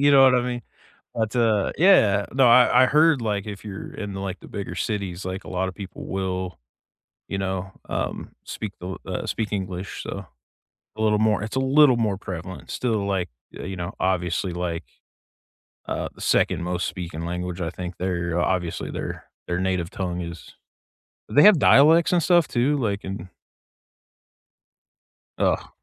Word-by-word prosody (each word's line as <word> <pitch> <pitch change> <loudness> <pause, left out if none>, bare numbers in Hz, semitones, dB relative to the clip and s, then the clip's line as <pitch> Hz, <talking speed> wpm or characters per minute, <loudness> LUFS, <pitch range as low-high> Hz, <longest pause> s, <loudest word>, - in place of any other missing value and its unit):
You 145 +1 +5
know 135 - +8
what 130 -1 +7
I 125 - +4
mean? 120 -1 -3 0.5
But, 110 +1 -2
uh, 110 -4 +2
yeah. 105 - +5
No, 130 -1 +5
I 125 +1 +6
I - - +6
heard, 150 -2 +4
like, 105 -3 -1
if 100 -2 -7
you're 100 -2 -7
in, 100 -1 -5
like, 95 -1 -4
the - - -13
bigger 95 -3 -6
cities, 95 -2 -3
like, 95 +1 -4
a - - -9
lotta 95 +1 -1
people 100 0 -8
will, 95 -3 -3 0.7
you 100 - -3
know, 95 0 -3 0.2
um, - - -3
speak 105 -3 -5
the 90 - -7
l 95 - -5
uh, 95 - -3
speak 110 -2 -2
English, 95 -1 -4
so 100 -2 -6 0.7
a 110 - -3
little 105 -1 +3
more 110 -1 +2
it's 110 - -5
a - - +3
little 135 -1 +5
more 105 -5 0
prevalent. 90 -1 -7
Still, 110 -5 -1
like, 95 -3 -1 0.3
uh, - - -6
you 95 +1 -5
know, 90 +1 -4
obviously, 90 -2 0
like, 85 -1 -3 1.0
uh, - - -2
the - - -13
second 90 - +2
most 90 +1 -1
speaking 85 -3 -5
language. 90 +1 -4
I 85 - -1
think 90 0 -7
there 85 -2 -1
obviously 85 -1 -1
their - - -5 0.2
their 90 +1 -1
native 95 -2 -1
tongue 90 -2 -3
is 85 -1 -8 0.7
They 145 - +5
have 210 -4 +8
dialects 160 +6 +6
and 175 - +3
stuff 175 -2 +4
too, 130 +5 +1
like 100 -6 -1
in 95 -1 -6 2.1
Ugh. - - +1
95 Hz, 170 wpm, -24 LUFS, 90-115 Hz, 2.1 s, know